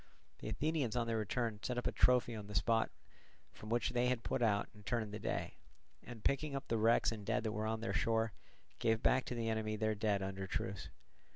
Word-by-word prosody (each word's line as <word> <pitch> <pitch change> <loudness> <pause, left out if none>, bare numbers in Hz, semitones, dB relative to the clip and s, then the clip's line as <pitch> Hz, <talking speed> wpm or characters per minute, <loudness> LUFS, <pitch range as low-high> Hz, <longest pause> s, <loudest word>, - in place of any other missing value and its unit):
The - - -5
Athenians 150 -7 0
on 120 -1 +1
their 115 -1 0
return 110 0 -1
set 125 - -2
up 125 - -2
a - - +2
trophy 125 -1 +4
on 105 -2 -6
the 105 - -7
spot 115 +2 +3 0.6
from 110 - -10
which 120 +1 +1
they 125 0 +2
had 125 -2 0
put 130 - -1
out 105 -3 +3
and 105 -1 -15
turned 110 -2 -1
the 105 - -4
day, - - -3 0.5
and 120 -3 -9
picking 140 +1 +1
up 135 0 -5
the 115 - +1
wrecks 115 +2 +4
and 110 -2 -5
dead 110 +2 0
that 110 - -1
were 105 +1 -2
on 110 0 -1
their 95 -3 -2
shore, 110 +1 +1 0.5
gave 110 0 +2
back 130 0 +4
to 125 - -3
the 115 -1 -1
enemy 110 -1 0
their 110 0 +1
dead 105 -2 +1
under 95 0 -4
truce. 95 0 -3
110 Hz, 225 wpm, -37 LUFS, 105-120 Hz, 0.6 s, trophy